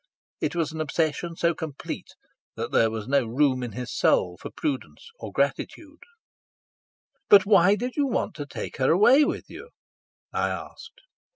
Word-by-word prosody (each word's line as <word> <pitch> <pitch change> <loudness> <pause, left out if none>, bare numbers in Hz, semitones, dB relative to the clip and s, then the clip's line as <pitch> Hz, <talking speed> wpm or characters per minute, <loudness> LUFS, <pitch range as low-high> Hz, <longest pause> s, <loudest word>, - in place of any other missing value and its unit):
It - - -2
was 165 -2 -1
an 160 0 -4
obsession 160 +2 -1
so 170 +1 +1
complete 155 -4 -7 0.4
that - - -4
there 115 - +3
was 110 -1 -5
no 140 0 +3
room 130 +2 +1
in 120 -4 -5
his 125 +1 -6
soul 90 -1 +2
for - - -6
prudence 150 - -5
or - - -7
gratitude. 310 -1 -2 1.3
"But 195 -2 +8
why 200 -1 +5
did 245 +3 -4
you 285 -2 +1
want 245 - -1
to 145 -2 -6
take - - -7
her 130 - +2
away 245 - +6
with - - -3
you?" 470 - -11 0.6
I - - 0
asked. 465 +3 -8
160 Hz, 165 wpm, -25 LUFS, -, 1.3 s, But